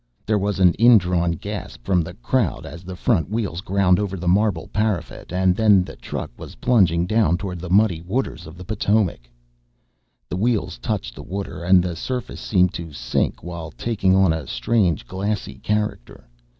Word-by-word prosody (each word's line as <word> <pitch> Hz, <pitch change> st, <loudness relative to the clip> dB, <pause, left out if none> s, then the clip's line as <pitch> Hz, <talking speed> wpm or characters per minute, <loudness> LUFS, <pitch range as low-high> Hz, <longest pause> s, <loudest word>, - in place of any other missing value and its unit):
There 110 Hz, -1 st, +1 dB
was 100 Hz, 0 st, -1 dB
an 90 Hz, -2 st, +5 dB
indrawn 90 Hz, -7 st, +4 dB
gasp 70 Hz, -5 st, -7 dB
from 90 Hz, +3 st, +3 dB
the 85 Hz, +2 st, -7 dB
crowd 115 Hz, -, -1 dB
as 85 Hz, +4 st, -9 dB
the 95 Hz, 0 st, -7 dB
front 90 Hz, -4 st, +1 dB
wheels 100 Hz, -6 st, -2 dB
ground 95 Hz, -2 st, +2 dB
over 100 Hz, -2 st, -2 dB
the 90 Hz, 0 st, -5 dB
marble 95 Hz, -2 st, +2 dB
parapet 105 Hz, -4 st, -2 dB
then 95 Hz, +2 st, +3 dB
the -, -, -9 dB
truck -, -, -6 dB
was -, -, -9 dB
plunging 90 Hz, -9 st, +3 dB
down 105 Hz, -4 st, +2 dB
toward 90 Hz, -2 st, -5 dB
the 90 Hz, +1 st, -7 dB
muddy 95 Hz, -3 st, +3 dB
waters 100 Hz, +1 st, -3 dB
of 80 Hz, +2 st, -11 dB
the 90 Hz, -, -9 dB
Potomac. 100 Hz, -, 0 dB, 1.0 s
The 90 Hz, -, -4 dB
wheels 110 Hz, -, 0 dB
touched -, -, -3 dB
the -, -, -10 dB
water 95 Hz, -2 st, -5 dB
and 90 Hz, 0 st, +5 dB
the 90 Hz, -2 st, -3 dB
surface 125 Hz, +8 st, -4 dB
seemed 90 Hz, -3 st, +2 dB
to 85 Hz, -2 st, -6 dB
sink -, -, -1 dB
while 85 Hz, -2 st, -6 dB
taking 95 Hz, +1 st, 0 dB
on 95 Hz, -3 st, +4 dB
a 80 Hz, -5 st, -5 dB
strange 100 Hz, -9 st, +1 dB
glassy 100 Hz, +2 st, -3 dB
character. 105 Hz, -, -3 dB
95 Hz, 175 wpm, -22 LUFS, 85-105 Hz, 1.0 s, an